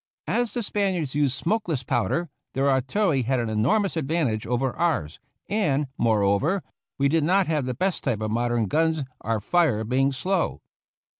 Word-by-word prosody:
As 240 -3 0
the 240 - -1
Spaniards 190 -9 -1
used 145 -2 +1
smokeless 170 - -1
powder, 130 +8 0 0.3
their 135 +1 +1
artil 140 +10 +2
lery 135 -5 +2
had 130 +2 0
an 115 -2 -2
enormous 170 - +1
advantage 150 -8 -1
over 125 +2 0
ours, 155 - -1 0.3
and, 150 -10 0
moreover, 115 - +2 0.3
we 140 - +3
did 160 +2 +2
not 185 +4 +3
have 150 -5 -1
the 125 - -2
best 190 +6 -1
type 120 -6 0
of 110 0 -2
mod 120 +2 0
ern 120 -2 +1
guns, 160 - +1 0.2
our 115 -1 -1
fire 135 - +2
being 130 +4 +1
slow. 180 +7 -1
140 Hz, 170 wpm, -25 LUFS, 120-170 Hz, 0.3 s, we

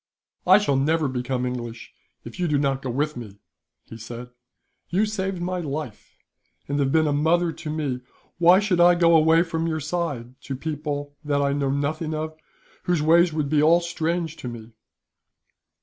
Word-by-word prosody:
"I 190 +2 +8
shall 145 -10 +1
never 155 +3 +1
become 125 0 -2
English, 120 -2 -6 0.3
if - - -10
you 175 - +1
do 150 -2 +1
not 135 -1 0
go 130 - -4
with 150 +5 -1
me," 105 -5 -9 0.5
he 115 - -10
said. 120 +2 -8 0.6
"You 195 +5 +2
saved 195 -3 -3
my 180 0 -2
life, 145 -7 -6 0.5
and 145 +1 -1
have 135 -1 +1
been 160 +1 +3
a 150 - +1
mother 165 +4 +2
to 160 0 -8
me. 145 -5 -2 0.4
Why 175 +2 +7
should 200 -4 0
I 175 0 +7
go 170 -1 +4
away 160 +1 +5
from 165 -1 -2
your 160 -1 -1
side, 145 -6 -4
to 135 - -5
people 145 0 -4
that 145 -1 0
I 140 0 +1
know 140 -1 0
nothing 155 +3 -2
of, 155 +1 -4 0.5
whose 175 -4 +1
ways 170 +2 +5
would 155 -2 -1
be 150 +1 +2
all 165 +3 +5
strange 170 -1 -2
to - - -7
me?" 115 -1 -8
155 Hz, 180 wpm, -24 LUFS, 135-170 Hz, 0.6 s, I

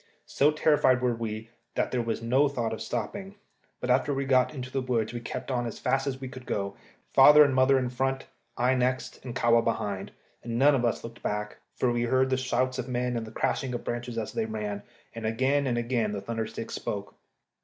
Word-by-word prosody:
So 145 - +3
terrified 150 -4 +3
were 125 -1 +1
we 115 0 -5 0.2
that - - 0
there 125 - +1
was 115 0 -3
no 130 +5 +3
thought 120 -5 -2
of 110 - -6
stopping, 190 - -4 0.4
but 125 - -1
after 130 +3 +2
we 135 0 -1
got 130 -1 +3
into 130 -3 -7
the 135 - -1
woods 120 -3 -1
we 120 - -3
kept 120 +2 -5
straight 130 - 0
on 120 - -2
as 115 - -6
fast 135 +1 0
as 130 -1 -2
we 135 - -5
could 130 -1 -10
go, 100 -1 -2 0.4
father 150 +3 +9
and 140 -2 +2
mother 130 +1 +4
in 125 -2 -1
front, 135 +1 -1 0.3
I 125 +2 +3
next, 130 0 -1
and 125 -2 -6
Kahwa 115 -2 +4
behind; 100 -4 -2 0.3
and 115 0 -3
none 145 +3 +6
of 125 -3 +1
us 115 - 0
looked 115 0 -9
back, 105 0 -3 0.2
for 125 - +1
we 120 0 0
heard 130 +2 +2
the 130 - +3
shouts 130 0 0
of 125 - -3
men 125 0 -1
and 115 -1 -3
the - - -9
crashing 125 +2 -1
of 120 - -5
branches 120 0 -4
as 110 - -3
they 110 - -1
ran, 105 -2 -4 0.3
and 115 -1 -4
again 135 +5 +1
and 120 -2 0
again 120 -3 0
the 100 - -3
thunder 115 0 -3
stick 115 0 -7
spoke. 100 -1 -4
125 Hz, 230 wpm, -28 LUFS, 115-130 Hz, 0.4 s, father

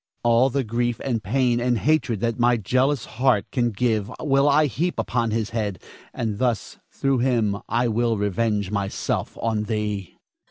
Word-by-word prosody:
All 120 +2 +4
the 135 +1 0
grief 120 +1 -1
and 120 -5 -1
pain 120 +3 +1
and 120 0 +1
hatred 135 -7 +1
that 115 0 -1
my 120 0 +4
jealous 130 +5 +1
heart 125 -4 +1
can 120 -3 +1
give 110 -1 -1
will 140 -1 +3
I 150 +2 +4
heap 155 - -2
upon 120 -2 0
his 110 0 -2
head, 105 -5 -2 0.3
and 110 -3 -3
thus 120 -4 -1
through 135 -2 0
him 115 -5 +1
I 120 +3 +1
will 115 0 +1
revenge 105 0 0
myself 100 -1 -2
on 110 -2 0
thee. 105 -3 -3
115 Hz, 165 wpm, -23 LUFS, 105-125 Hz, 0.3 s, All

